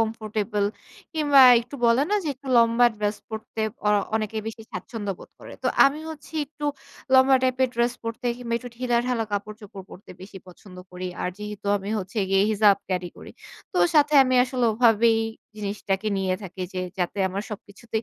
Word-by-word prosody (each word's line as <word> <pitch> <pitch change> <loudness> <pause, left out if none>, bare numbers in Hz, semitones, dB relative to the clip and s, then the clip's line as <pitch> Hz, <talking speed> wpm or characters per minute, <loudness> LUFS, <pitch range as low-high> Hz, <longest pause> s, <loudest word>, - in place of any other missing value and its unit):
Comfortable, 215 -2 -1 0.5
কিংবা 290 -3 +4 0.2
একটু 245 +4 -11
বলে 235 +4 +4
না? 420 - +3
যে 310 - -2
একটু 265 +1 -12
লম্বা 230 +1 +5
ড্রেস 210 0 -1
পড়তে 220 0 -7 0.3
অ - - +4 0.3
অনেকে 220 0 -2
বেশি 225 0 -6
স্বাচ্ছন্দ্য 210 -4 -5
বোধ - - -14
করে। - - -11
তো - - -1 0.2
আমি 285 +3 +2
হচ্ছি 315 0 -11
একটু 295 +1 -9 0.5
লম্বা 265 0 +6
টাইপ 255 -1 +1
এর 260 - +3
ড্রেস 235 0 +1
পড়তে, 230 +2 -5
কিংবা 235 -2 -4
একটু 245 0 -9
ঢিলাঢালা 240 -1 0
কাপড়-চোপড় 205 -1 -6
পড়তে, 190 - -13
বেশি 190 0 -10
পছন্দ 180 +1 -15
করি। 180 0 -6 0.2
আর - - -1
যেহেতু 210 -1 -7
আমি 195 +1 -8
হচ্ছে 195 +3 -5
গিয়ে 195 0 +4
হিজাব 210 -1 +5
ক্যারি 180 -2 -2
করি। - - -11 0.4
তো - - -1 0.2
সাথে 300 0 +4
আমি 255 0 0
আসলে 255 -1 -2
ওভাবেই 225 0 +4 0.4
জিনিসটাকে 205 0 -2
নিয়ে 185 -1 0
থাকি, 185 0 -9
যে 185 - -4 0.2
যাতে 180 +3 -2
আমার 195 +2 -4
সবকিছুতেই 215 +2 -6
220 Hz, 175 wpm, -24 LUFS, 200-245 Hz, 0.5 s, লম্বা